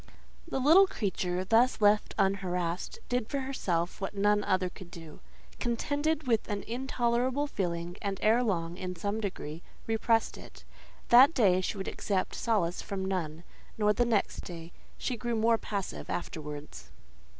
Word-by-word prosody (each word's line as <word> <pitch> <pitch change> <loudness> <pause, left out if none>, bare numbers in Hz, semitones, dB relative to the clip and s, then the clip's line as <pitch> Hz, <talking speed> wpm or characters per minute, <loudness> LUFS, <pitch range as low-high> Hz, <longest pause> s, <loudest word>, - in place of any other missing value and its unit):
The 330 - -3
little 320 +9 +6
creature, 185 - -2
thus 230 +5 +3
left 210 0 +3
unharassed, 185 - -1
did 245 -2 -1
for 280 -1 -1
herself 185 -11 -2
what 195 +1 -4
none 205 +1 +3
other 185 -1 +1
could 180 0 -11
do—contended 280 - -4
with 230 -4 +1
an 205 -1 -2
intolerable 250 +2 0
feeling; 175 -7 -3
and, 200 -2 -2
ere 225 +3 +5
long, 175 -7 -1
in 180 -1 -5
some 200 +5 -2
degree, 165 -6 -5 0.2
repressed 225 0 +1
it. - - -13 0.5
That 260 +6 +8
day 185 -7 +4
she 185 - -3
would 190 - -4
accept 190 -3 -1
solace 200 -7 0
from 195 -1 -4
none; 170 -4 -3 0.3
nor 210 -1 +3
the 240 - +2
next 225 -4 0
day: 170 -1 -8 0.3
she 255 - -2
grew 235 +1 -2
more 225 +1 +3
passive 200 -3 -4
afterwards. 150 -3 -6
205 Hz, 150 wpm, -30 LUFS, 180-235 Hz, 0.5 s, That